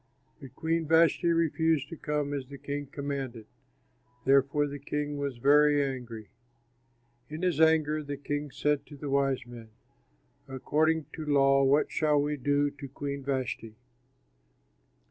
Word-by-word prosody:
But 130 -1 -12
Queen 165 0 -1
Vashti 165 +2 +4
refused 160 -3 +1
to - - -7
come 150 -2 -2
as 135 -2 -4
the 140 +1 -10
king 145 +1 -5
commanded. 135 -5 -5 0.8
Therefore 140 +2 +3
the 145 0 -6
king 145 +1 -3
was 140 -3 -3
very 145 +3 +4
angry. 120 -5 -7 1.0
In 155 +4 -6
his 170 -4 +1
anger 155 -1 +3
the 145 -1 -5
king 145 +1 -4
said 145 +1 -1
to 145 - -11
the 140 0 -5
wise 135 -2 +1
men, 120 -2 -11 0.8
"According 155 +4 0
to 160 - -6
law 135 -1 +4
what 140 +3 +3
shall 150 -2 +2
we 145 +1 0
do 145 +1 +1
to 140 -1 -9
Queen 140 +1 -5
Vashti?" 130 -5 -3
145 Hz, 145 wpm, -29 LUFS, 135-150 Hz, 1.0 s, Vashti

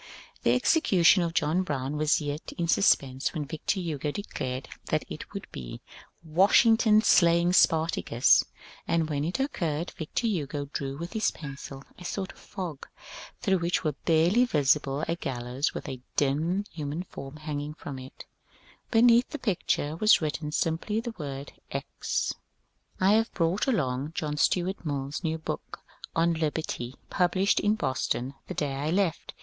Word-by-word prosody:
The 120 - +3
execution 185 - +4
of 170 -1 -2
John 160 +3 +2
Brown 145 -5 -2
was 150 +1 +2
yet 145 0 -5
in 170 - -1
suspense 135 -7 +2
when 150 -2 -2
Victor 160 +6 -2
Hugo 155 -5 -2
declared 130 -7 -4 0.2
that - - 0
it - - -8
would - - -6
be - - -7 0.2
" - - -23 0.2
Washington 215 +6 +5
slaying 170 -2 +5
Spartacus; 160 -9 +4 0.2
" - - -20
and 160 -2 +1
when 145 -1 -1
it 175 - -2
occurred 170 - -1
Victor 160 +9 -3
Hugo 150 -9 -1
drew 135 0 -3
with 170 +3 -6
his 220 -1 +2
pencil 140 -2 -8 0.2
a - - -10
sort 190 +1 -3
of - - -19
fog 170 -7 -6 0.5
through 195 -5 +2
which 170 +1 0
were 155 - +1
barely 165 - +3
visible 145 - +2
a 165 - 0
gallows 125 -2 -3
with - - -5
a 130 -2 -6
dim 160 +8 +1
human 155 +2 -4
form 135 -5 -9
hanging 150 -1 -4
from 140 -3 -7
it: 130 0 -11 0.6
beneath 235 +1 +5
the 300 - -5
picture 170 - -1
was 215 +4 +6
written 150 -1 -3
simply 165 +7 0
the 235 0 -5
word 140 -2 -6 0.2
Eccel^ - - -2 0.7
I 190 +1 +4
have 225 +1 +2
brought 170 +7 +1
along 145 - 0
John 150 -1 -2
Stuart 180 +5 +1
MilFs 145 +1 -3
new 160 -1 0
book 160 - -6 0.3
on 170 +1 +3
Liberty, 155 -6 -3 0.2
published 185 +2 +2
in 210 +1 +2
Boston 130 - -1
the - - -5
day 145 -2 -1
I 140 +3 -2
left. 180 -1 0
160 Hz, 160 wpm, -28 LUFS, 145-185 Hz, 0.7 s, was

